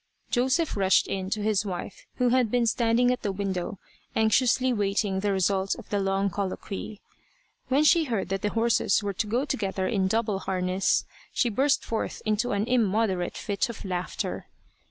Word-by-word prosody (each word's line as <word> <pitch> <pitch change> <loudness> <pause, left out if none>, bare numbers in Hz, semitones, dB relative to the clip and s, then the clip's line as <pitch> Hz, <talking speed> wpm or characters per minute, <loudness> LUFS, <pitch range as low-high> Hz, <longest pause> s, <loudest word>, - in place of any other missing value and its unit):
Joseph 265 +6 +1
rushed 190 -2 +3
in 190 -1 -3
to 210 +1 -2
his 210 -2 +2
wife 190 -1 -6
who 250 -1 +2
had 250 -2 +3
been 245 +1 +2
standing 235 +2 +2
at 250 - -2
the 205 - -1
window 190 -1 -3 0.4
anxiously 250 +3 +3
waiting 200 -2 0
the 205 +1 0
result 190 0 +1
of 240 - -11
the 205 - +1
long 195 0 0
colloquy. 200 +2 -5 0.7
When 275 +3 +3
she 325 +1 +5
heard 225 -9 -2
that 195 0 -2
the 210 - 0
horses 225 -2 +2
were 200 -1 -2
to 210 +3 -2
go 240 +6 0
together 195 -7 -2
in 195 -5 +1
double 215 -1 0
harness, 185 0 0 0.3
she 245 - +1
burst 275 +6 +1
forth 225 - -3
into 215 +3 +1
an 200 +1 0
immoderate 215 -6 +1
fit 205 +4 -1
of 230 - -8
laughter. 180 -1 -3
210 Hz, 175 wpm, -27 LUFS, 195-235 Hz, 0.7 s, she